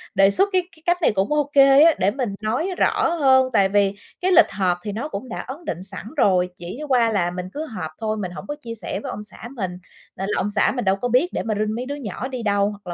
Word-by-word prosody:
đề 195 Hz, 0 st, +6 dB
xuất 390 Hz, -, +3 dB
cái 370 Hz, -, +4 dB
cái 315 Hz, -, -22 dB
cách 350 Hz, 0 st, +3 dB
này -, -, +4 dB
cũng 195 Hz, +6 st, 0 dB
ô 295 Hz, -1 st, +1 dB
kê 275 Hz, +1 st, +7 dB
á, 330 Hz, 0 st, +6 dB
để 190 Hz, +2 st, +3 dB
mình 240 Hz, -5 st, -3 dB
nói 245 Hz, -, -1 dB
rõ -, -, +2 dB
hơn. 260 Hz, -4 st, +4 dB
Tại 195 Hz, -3 st, +4 dB
vì 200 Hz, -1 st, +2 dB, 0.3 s
cái 370 Hz, -, +1 dB
lịch 360 Hz, -, +6 dB
họp 185 Hz, -3 st, 0 dB
thì 210 Hz, -, -4 dB
nó 225 Hz, +8 st, -4 dB
cũng 250 Hz, 0 st, -6 dB
đã -, -, -5 dB
ấn 285 Hz, +7 st, -8 dB
định 175 Hz, -, -4 dB
sẵn 195 Hz, +1 st, -7 dB
rồi, 185 Hz, -7 st, +3 dB
chỉ 175 Hz, +9 st, -8 dB
qua 240 Hz, -3 st, +3 dB
là 175 Hz, -5 st, 0 dB
mình 180 Hz, 0 st, -5 dB
cứ 305 Hz, +2 st, -4 dB
họp 215 Hz, -, -6 dB
thôi, 220 Hz, -1 st, -2 dB
mình 185 Hz, -4 st, -4 dB
hổng 180 Hz, -, -9 dB
có 295 Hz, -, -3 dB
chia 230 Hz, -3 st, -6 dB
sẻ 220 Hz, -, -5 dB
với 270 Hz, -, -5 dB
ông 210 Hz, -, -6 dB
xã 210 Hz, +2 st, -10 dB
mình 190 Hz, -7 st, -3 dB, 0.4 s
nên 195 Hz, +1 st, -4 dB
là -, -, 0 dB
ông 205 Hz, -, -1 dB
xã 205 Hz, 0 st, +2 dB
mình 245 Hz, -, -2 dB
đâu 190 Hz, 0 st, +3 dB
có 220 Hz, +5 st, -3 dB
biết 250 Hz, +8 st, +2 dB
để -, -, -2 dB
mà 220 Hz, -, -1 dB
rinh 215 Hz, 0 st, -1 dB
mấy 245 Hz, +2 st, -4 dB
đứa 285 Hz, +2 st, -4 dB
nhỏ 255 Hz, -2 st, -5 dB
đi 255 Hz, -3 st, -5 dB
đâu, 200 Hz, -1 st, +2 dB
hoặc 205 Hz, -2 st, -11 dB
220 Hz, 285 wpm, -22 LUFS, 195-270 Hz, 0.4 s, kê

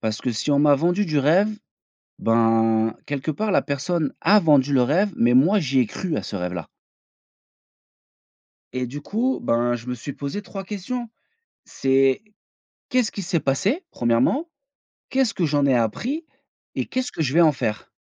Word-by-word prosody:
parce 110 Hz, -2 st, -2 dB
que 125 Hz, -, -2 dB
si 110 Hz, +7 st, -2 dB
on 140 Hz, -, +3 dB
m'a 145 Hz, -1 st, +5 dB
vendu 175 Hz, +7 st, +1 dB
du 155 Hz, -2 st, 0 dB
rêve, 175 Hz, +9 st, +4 dB, 0.7 s
ben, 115 Hz, -1 st, +2 dB
quelque 145 Hz, +2 st, -3 dB
part, 210 Hz, +7 st, -2 dB
la -, -, +3 dB
personne 145 Hz, +1 st, -2 dB
a 210 Hz, +1 st, +5 dB
vendu 145 Hz, -3 st, +3 dB
le 130 Hz, -, +4 dB
rêve 180 Hz, +9 st, +1 dB
mais 120 Hz, +1 st, +3 dB
moi 175 Hz, +11 st, +5 dB
j'y 135 Hz, -4 st, +1 dB
ai 125 Hz, -, +3 dB
cru 170 Hz, -, -4 dB
à -, -, -3 dB
ce 105 Hz, -, -6 dB
rêve-là». 90 Hz, -3 st, -4 dB, 2.1 s
Et 125 Hz, -1 st, -2 dB
du 145 Hz, +4 st, -7 dB
coup, 240 Hz, -, -1 dB
ben, 120 Hz, +1 st, +1 dB
je 115 Hz, +1 st, -12 dB
me 125 Hz, -, -3 dB
suis 130 Hz, +4 st, -7 dB
posé 140 Hz, +10 st, -5 dB
3 195 Hz, 0 st, -7 dB
questions, 225 Hz, +5 st, -5 dB, 0.6 s
c'est: 135 Hz, +5 st, +1 dB, 0.7 s
«Qu'est-ce 250 Hz, -4 st, +1 dB
qui 200 Hz, -, -5 dB
s'est 170 Hz, -2 st, 0 dB
passé?», 200 Hz, -, 0 dB
1°. 125 Hz, -, +1 dB, 0.6 s
«Qu'est-ce 260 Hz, -4 st, +1 dB
que 170 Hz, -, 0 dB
j'en 145 Hz, -1 st, +1 dB
ai 135 Hz, -, +3 dB
appris?» 245 Hz, -, -1 dB, 0.5 s
Et: -, -, -1 dB
«Qu'est-ce 255 Hz, 0 st, -3 dB
que -, -, -7 dB
je 135 Hz, 0 st, -1 dB
vais 170 Hz, -, +5 dB
en 160 Hz, -, +6 dB
faire?». 115 Hz, -5 st, -4 dB
145 Hz, 175 wpm, -23 LUFS, 125-195 Hz, 2.1 s, en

